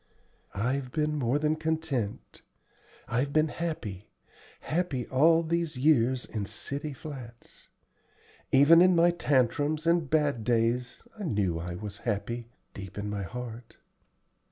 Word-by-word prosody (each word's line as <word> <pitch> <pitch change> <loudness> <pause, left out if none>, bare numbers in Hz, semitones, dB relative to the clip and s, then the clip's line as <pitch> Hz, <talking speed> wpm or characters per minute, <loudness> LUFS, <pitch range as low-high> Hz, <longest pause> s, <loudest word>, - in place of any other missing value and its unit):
"I've 125 +5 -1
been 150 0 0
more 130 -1 +1
than 150 +1 +1
content; 155 -9 -3 0.7
I've 130 +4 0
been 155 +1 +3
happy 120 - -5 0.5
happy 155 -7 -1
all 160 +5 +4
these 165 -3 -1
years 130 -3 +3
in 105 -3 -4
city 140 +8 -4
flats. 130 -5 -10 0.8
Even 145 +5 +7
in 180 0 +6
my 170 +1 +5
tantrums 150 0 +1
and 170 -3 +2
bad 145 -6 +1
days 120 +2 0 0.2
I 205 - -4
knew 100 - 0
I 85 +1 -5
was 105 +2 -7
happy, 115 +3 -3 0.3
deep 95 -1 -9
in 105 0 -3
my 100 -1 -3
heart." 115 +4 -7
130 Hz, 130 wpm, -28 LUFS, 115-155 Hz, 0.8 s, Even